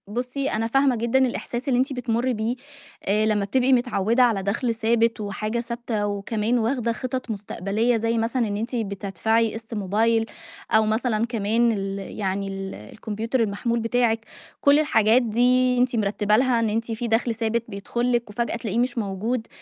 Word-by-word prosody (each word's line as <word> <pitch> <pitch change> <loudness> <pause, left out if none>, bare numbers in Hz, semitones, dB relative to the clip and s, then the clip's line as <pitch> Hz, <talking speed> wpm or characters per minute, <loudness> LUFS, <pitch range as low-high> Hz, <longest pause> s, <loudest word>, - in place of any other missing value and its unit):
بُصّي 250 +5 -3
أنا 225 +1 0
فاهمة 270 +2 +3
جدًا 235 +3 +1
الإحساس 250 0 -2
اللي 250 -2 +2
أنتِ 265 +2 0
بتمُري 245 0 0
بيه 225 +2 -1 0.5
آآ 210 +2 +2
لمّا 210 -2 +1
بتبقي 260 +5 +2
متعوّدة 240 -1 +2
على 220 -6 +2
دَخل 230 +4 -1
ثابت 230 0 +1
وحاجة 215 +3 -3
ثابتة، 235 -3 -3
وكمان 210 +3 -1
واخدة 235 0 0
خِطط 255 0 -4
مستقبلية 210 +3 -1
زي 230 +1 0
مثلًا 230 +1 0
إن 205 -1 -2
أنتِ 230 +4 -3
بتدفعي 220 +1 0
قسط 225 +1 -8
موبايل، 225 +3 +1 0.5
أو 220 -1 +5
مثلًا 220 0 +1
كمان 230 0 +1
ال 195 -2 -3 0.2
يعني 195 0 -1
ال 195 0 -5
الكمبيوتر 220 - -4
المحمول 230 +3 -1
بتاعِك، 230 0 +1 0.4
كلّ 285 +1 +5
الحاجات 230 -5 +4
دي 250 +2 +3
أنتِ 250 0 +2
مِرتّبة 210 -1 +1
لها 250 -1 +3
إن 225 -1 +1
أنتِ 230 +2 -2
في 225 +2 -3
دَخل 230 +1 +1
ثابت 230 +1 -1
بيدخل 235 +4 -2
لِك 235 -2 0
وفجأة 235 +3 -2
تلاقيه 225 -2 -3
مش 245 0 0
موجود، 220 +3 -2
230 Hz, 170 wpm, -24 LUFS, 210-245 Hz, 0.5 s, أو